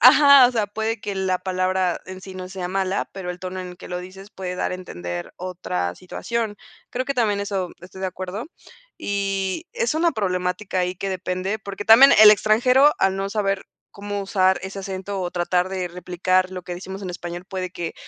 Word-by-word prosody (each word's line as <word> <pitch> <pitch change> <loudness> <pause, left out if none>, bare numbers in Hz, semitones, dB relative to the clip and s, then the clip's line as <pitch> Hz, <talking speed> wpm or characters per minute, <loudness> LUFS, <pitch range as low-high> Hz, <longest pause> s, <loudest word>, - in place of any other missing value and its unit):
ajá, 275 +2 +9
o 245 - -1
sea, 220 -4 +1
puede 220 +2 -2
que 205 - -3
la 190 -1 0
palabra 185 -1 0
en 185 0 -9
sí 190 0 -9
no 185 0 -6
sea 185 -1 -5
mala, 190 +1 -1
pero 190 -2 -5
el 180 - -7
tono 185 +1 -5
en 180 -1 -8
que - - -11
lo 180 - -3
dices 190 +3 -10
puede 185 -3 -5
dar - - -1
a - - -1
entender 85 - -6
otra 170 - -3
situación. 220 - -3 0.3
Creo 255 +1 -2
que 275 - -1
también 215 -5 +1
eso 195 -3 -2
estoy 185 +1 -11
de 190 - -1
acuerdo. 185 - -5 0.5
Y 195 - -2
es 475 -1 0
una 330 +1 +2
problemática 185 -2 -1
ahí 180 0 0
que 195 +2 -3
depende, 185 +2 -2
porque 200 0 -7
también 240 +6 +9
el 215 -1 +11
extranjero, 250 +7 +5
al 195 0 +3
no 195 0 -2
saber 200 -2 -1 0.2
cómo 205 0 -5
usar 190 -1 +2
ese 190 +1 -6
acento 195 +1 -4
o 180 -1 -2
tratar 180 +1 +1
de 185 -2 -2
replicar 180 +1 0
lo 185 -1 -6
que 175 - -6
decimos 190 +2 -7
en 185 - -4
español, 175 0 -6
puede 185 -1 -4
que 170 -2 -5
190 Hz, 200 wpm, -23 LUFS, 180-205 Hz, 0.5 s, el